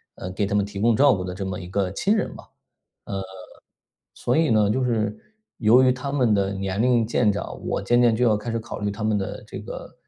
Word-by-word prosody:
呃， 90 - -6
给 100 +2 -1
他 100 - -2
们 100 -1 +2
提 100 -1 -7
供 115 +1 +3
照 140 +1 +5
顾 90 -1 -4
的 90 - -5
这 95 +1 -5
么 95 -1 -4
一 90 - -8
个 95 -1 -1
亲 200 - +1
人 210 - -1
嘛。 - - -11
呃， - - -25 1.7
所 120 - -1
以 160 -1 +3
呢， 105 -2 +4
就 130 +4 0
是 110 -4 0 0.4
由 115 +3 +5
于 130 -1 +5
他 130 +2 -5
们 125 -7 +2
的 100 0 +1
年 95 +1 -2
龄 120 -2 +3
渐 115 -1 +2
长， 100 - -4
我 - - -1
渐 120 0 +3
渐 115 -2 +4
就 125 - +2
要 110 -3 +4
开 105 +3 -5
始 115 - -1
考 110 - -7
虑 105 0 -1
他 105 +2 -5
们 110 -1 +2
的 95 - -5
这 - - -8
个 - - -9
110 Hz, 270 characters per minute, -24 LUFS, 100-120 Hz, 1.7 s, 照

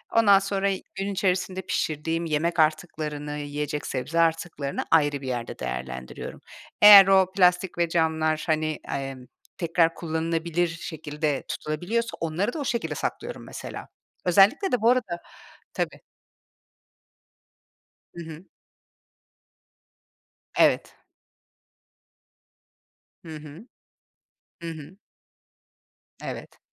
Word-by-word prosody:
Ondan 205 -4 +6
sonra 195 0 -1 0.3
gün 195 +1 -2
içerisinde 185 -1 0
pişirdiğim 165 -2 -2
yemek 165 +2 0
artıklarını, 155 -2 -1
yiyecek 145 0 -4
sebze 140 +6 -2
artıklarını 165 -4 0
ayrı 145 -3 +3
bir 135 - -7
yerde 120 -2 -4
değerlendiriyorum. 65 0 -6 0.4
Eğer 205 -2 +11
o 190 -1 +4
plastik 180 -1 +3
ve 170 -1 +1
camlar, 160 -2 +1
hani, 155 -1 0 0.2
emm, 135 -2 -5 0.3
tekrar 165 -1 +2
kullanılabilir 165 +1 -1
şekilde 155 -3 -3
tutulabiliyorsa 200 +10 -3
onları 170 +8 -1
da - - -4
o 285 - -3
şekilde 235 -2 -2
saklıyorum - - -4
mesela. - - -8 0.4
Özellikle 200 - +4
de 250 - +1
bu 230 - +5
arada 225 -9 +1 0.6
tabii. - - -3 2.2
Hı 170 - -7
hı. 160 +2 -10 2.1
Evet. - - +3 2.3
Hı 160 -1 -7
hı. 150 - -12 0.9
Hı 170 - -5
hı. 160 +3 -10 1.3
Evet. - - -7
165 Hz, 100 wpm, -25 LUFS, 150-190 Hz, 2.3 s, Eğer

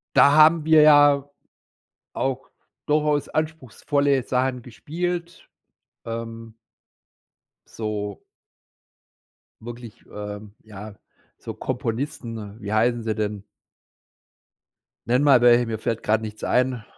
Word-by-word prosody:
Da 140 - +6
haben 155 +1 +6
wir 160 -1 +6
ja 145 -2 +5 0.9
auch 135 0 -3 0.4
durchaus 150 -1 0
anspruchsvolle 145 -2 -1
Sachen 125 0 -1
gespielt. 170 +8 -5 0.6
Ähm 115 0 -7 1.1
So 105 -2 -5 1.4
Wirklich, 120 0 -10
ähm, 105 0 -8
ja 105 -1 -11 0.4
so - - -8
Komponisten 115 -4 -5
wie 100 0 -6
heißen 120 +2 +1
sie 110 -1 -2
denn? 105 -2 -3 1.6
Nenn 125 +3 +2
mal 135 -4 +5
welche, 120 0 +5
mir 110 -2 -4
fällt 115 0 -3
gerade 110 +1 +1
nichts 110 0 -8
ein. 125 -2 0
120 Hz, 100 wpm, -23 LUFS, 110-145 Hz, 1.6 s, Da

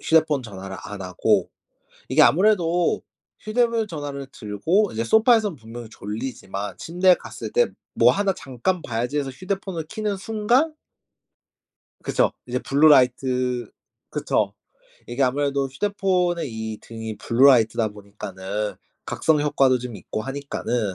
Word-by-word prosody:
휴대폰 155 -4 +3
전화를 95 -4 -8
안 100 -2 -7
하고 90 -1 +1 0.6
이게 - - +5
아무래도 175 -2 +3 0.4
휴대폰 230 0 +1
전화를 145 -4 -5
들고 160 - 0
이제 110 - -2
소파에선 220 - +4
분명히 115 0 -9
졸리지만 105 -2 -5
침대에 180 +2 +3
갔을 - - -8
때 485 0 +4 0.3
"뭐 - - +5
하나 200 -1 +1
잠깐 145 +7 -2
봐야지." 120 +5 -2
해서 140 -2 -2
휴대폰을 185 +2 -4
켜는 215 -2 -2
순간 225 +9 +1 1.3
그쵸. - - +1
이제 125 +1 -1
블루 145 +4 +4
라이트 125 -3 +3 0.4
그쵸. - - 0 0.5
이게 120 +3 -2
아무래도 140 +1 +1
휴대폰의 180 0 0
이 110 -1 -5
등이 110 -1 -7
블루 115 +4 +2
라이트다 115 -4 +4
보니까는 100 0 -5 0.3
각성 155 -2 +1
효과도 135 -3 +3
좀 120 -2 -7
있고 105 +3 -5
하니까는 125 -6 -3
135 Hz, 305 characters per minute, -23 LUFS, 115-180 Hz, 1.3 s, 이게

